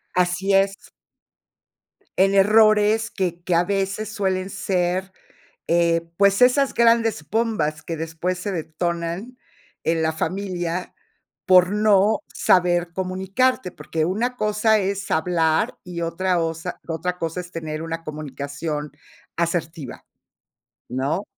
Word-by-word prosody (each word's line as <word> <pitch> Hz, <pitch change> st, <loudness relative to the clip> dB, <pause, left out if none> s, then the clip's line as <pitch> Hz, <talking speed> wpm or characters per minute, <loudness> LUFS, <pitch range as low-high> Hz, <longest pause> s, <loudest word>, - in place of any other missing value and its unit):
Así 180 Hz, +2 st, +1 dB
es. 195 Hz, +1 st, +1 dB, 1.3 s
En 195 Hz, +1 st, +4 dB
errores 215 Hz, +2 st, +4 dB
que 175 Hz, -3 st, -3 dB
que 175 Hz, -1 st, +1 dB
a 170 Hz, -, +4 dB
veces 195 Hz, +2 st, -2 dB
suelen 190 Hz, -3 st, -1 dB
ser, 185 Hz, 0 st, -1 dB, 0.6 s
eh, 170 Hz, 0 st, +2 dB
pues, 200 Hz, +1 st, +4 dB
esas 265 Hz, +2 st, +4 dB
grandes 230 Hz, -8 st, +2 dB
bombas 215 Hz, -9 st, -1 dB
que 165 Hz, -, -5 dB
después 165 Hz, +3 st, -3 dB
se 200 Hz, +2 st, -3 dB
detonan 170 Hz, +7 st, -3 dB, 0.5 s
en 165 Hz, 0 st, +1 dB
la 160 Hz, -, +1 dB
familia 180 Hz, 0 st, -3 dB, 0.5 s
por 180 Hz, 0 st, +6 dB
no 210 Hz, 0 st, +3 dB
saber 175 Hz, -1 st, +2 dB
comunicarte, 190 Hz, +6 st, 0 dB
porque 160 Hz, -2 st, -3 dB
una 230 Hz, +8 st, -1 dB
cosa 215 Hz, +1 st, +2 dB
es 200 Hz, 0 st, -3 dB
hablar 160 Hz, -1 st, +1 dB
y 175 Hz, -1 st, -6 dB
otra 180 Hz, +2 st, 0 dB
osa 165 Hz, +1 st, -3 dB
otra 170 Hz, +2 st, -3 dB
cosa 165 Hz, +1 st, -3 dB
es 180 Hz, 0 st, -13 dB
tener 155 Hz, -1 st, -5 dB
una 165 Hz, 0 st, -5 dB
comunicación 150 Hz, 0 st, -5 dB, 0.5 s
asertiva 165 Hz, -4 st, -3 dB, 0.9 s
¿no? 140 Hz, +10 st, -1 dB
180 Hz, 120 wpm, -22 LUFS, 165-200 Hz, 1.3 s, por